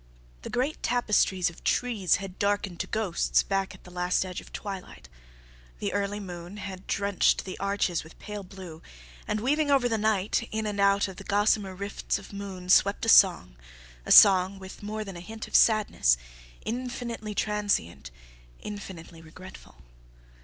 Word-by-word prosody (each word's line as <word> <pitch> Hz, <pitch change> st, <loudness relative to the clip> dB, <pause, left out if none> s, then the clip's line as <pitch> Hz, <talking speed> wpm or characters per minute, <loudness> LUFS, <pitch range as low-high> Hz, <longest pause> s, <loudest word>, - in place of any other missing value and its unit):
The -, -, -7 dB
great 265 Hz, +5 st, -1 dB
tapestries 205 Hz, -7 st, +1 dB
of 170 Hz, -, -17 dB
trees 215 Hz, -9 st, +1 dB
had 195 Hz, -1 st, -7 dB
darkened 200 Hz, -3 st, -1 dB
to -, -, -2 dB
ghosts 210 Hz, -6 st, +1 dB
back 195 Hz, -1 st, -2 dB
at -, -, -19 dB
the 180 Hz, -, -13 dB
last 180 Hz, +1 st, 0 dB
edge 185 Hz, -1 st, -6 dB
of -, -, -16 dB
twilight. 190 Hz, -, -8 dB, 0.7 s
The -, -, -3 dB
early 200 Hz, 0 st, -1 dB
moon 180 Hz, 0 st, -8 dB
had 190 Hz, -2 st, -8 dB
drenched 200 Hz, -1 st, +1 dB
the 185 Hz, -, -6 dB
arches 200 Hz, -4 st, 0 dB
with 160 Hz, -, -15 dB
pale 210 Hz, -1 st, -7 dB
blue, 180 Hz, -4 st, -11 dB, 0.5 s
and, 210 Hz, -, -1 dB
weaving 295 Hz, +5 st, +1 dB
over 270 Hz, -3 st, +4 dB
the 225 Hz, -2 st, -1 dB
night, 215 Hz, +1 st, 0 dB
in 220 Hz, 0 st, -3 dB
and 205 Hz, -1 st, -3 dB
out 200 Hz, 0 st, +3 dB
of 190 Hz, -2 st, -9 dB
the -, -, -9 dB
gossamer 205 Hz, -1 st, +1 dB
rifts 200 Hz, +1 st, -3 dB
of 195 Hz, +1 st, -12 dB
moon, 195 Hz, -2 st, -7 dB
swept 200 Hz, +4 st, +4 dB
a -, -, 0 dB
song, 175 Hz, -, +5 dB, 0.5 s
a -, -, -4 dB
song 190 Hz, -1 st, +7 dB
with 190 Hz, 0 st, -11 dB
more 215 Hz, +1 st, -4 dB
than 195 Hz, -4 st, -8 dB
a -, -, -7 dB
hint 220 Hz, +5 st, -8 dB
of -, -, -16 dB
sadness, 210 Hz, -, +4 dB, 0.5 s
infinitely 235 Hz, -3 st, -4 dB
transient, 200 Hz, -, -1 dB, 0.5 s
infinitely 180 Hz, -5 st, -9 dB
regretful. 165 Hz, -, -14 dB
200 Hz, 165 wpm, -27 LUFS, 185-215 Hz, 0.7 s, song